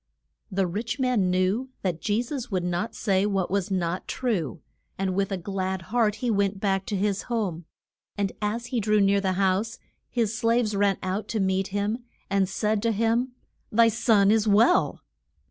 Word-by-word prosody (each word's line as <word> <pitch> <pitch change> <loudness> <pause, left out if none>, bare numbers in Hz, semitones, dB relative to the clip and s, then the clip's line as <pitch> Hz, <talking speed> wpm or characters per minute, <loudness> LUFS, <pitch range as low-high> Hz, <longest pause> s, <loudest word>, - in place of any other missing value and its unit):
The 190 0 +1
rich 220 +7 -3
man 250 -8 +2
knew 185 +8 +1
that 175 -4 -1
Je 215 +3 +1
sus 255 -1 -5
would 185 -4 -1
not 180 +6 -2
say 195 -2 +1
what 195 -3 -1
was 200 -1 0
not 180 -2 -2
true, 185 - -2 0.4
and 190 -1 -1
with 195 +1 0
a 195 - -1
glad 190 0 -3
heart 225 -2 +1
went 200 -4 +1
back 195 -1 0
to 205 - -2
his 200 0 0
home. 190 -8 -2 0.5
And 200 -1 0
as 220 +3 -1
he 240 - +2
drew 215 0 +2
near 200 0 +3
the 190 -1 0
house 195 +4 0 0.3
his 225 -3 0
slaves 230 -2 +1
ran 200 -1 +2
out 190 +3 -2
to 225 - -2
meet 190 0 +1
him, 205 +3 -1 0.3
and 195 -2 +2
said 210 +1 0
to 230 +1 +1
him, 230 +4 +1 0.4
Thy 230 +1 +5
son 215 -3 +3
is 220 0 +2
well. 205 - +4
200 Hz, 180 wpm, -26 LUFS, 190-225 Hz, 0.5 s, Thy